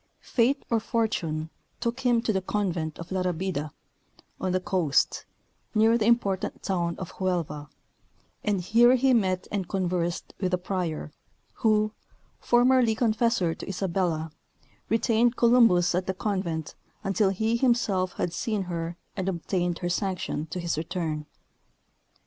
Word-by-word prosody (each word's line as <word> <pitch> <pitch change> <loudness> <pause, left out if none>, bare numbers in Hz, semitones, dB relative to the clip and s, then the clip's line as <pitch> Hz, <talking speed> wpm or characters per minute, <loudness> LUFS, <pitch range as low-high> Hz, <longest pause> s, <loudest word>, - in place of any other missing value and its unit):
Fate 265 +4 +1
or 230 - +3
fortune 175 -9 -1 0.3
took 235 +1 -2
him 240 -3 +2
to 220 - +1
the 190 - 0
convent 180 -6 -2
of 170 +2 -9
La 190 -1 0
Rabida, 180 -4 -2 0.7
on 185 - -1
the 185 - +2
coast, 180 -6 +1 0.5
near 220 +2 +5
the 225 -2 +1
important 200 -5 +1
town 170 -3 -1
of 185 - -6
Huelva, 165 -6 -2 0.7
and 205 -3 0
here 235 +7 +5
he 260 +1 +3
met 185 -5 +1
and 195 -4 -2
conversed 180 -3 -1
with 185 - 0
the - - +4
prior, 180 -5 -3 0.5
who, 215 -1 +3 0.5
formerly 245 -1 +4
confessor 225 -6 +1
to - - -8
Isabella, 175 -4 -1 0.6
retained 230 +1 +3
Columbus 230 -8 +5
at 180 +1 -1
the 190 - -1
convent 185 -6 -2 0.3
until 195 +1 +2
he 220 +4 0
himself 235 -7 +1
had 170 - -2
seen 210 +1 -1
her 170 -1 -4 0.2
and 190 -1 -1
obtained 175 -1 -1
her - - 0
sanction 180 -4 -2
to 180 - -5
his 170 -3 -1
return. 160 -2 -3
190 Hz, 140 wpm, -27 LUFS, 175-225 Hz, 0.7 s, near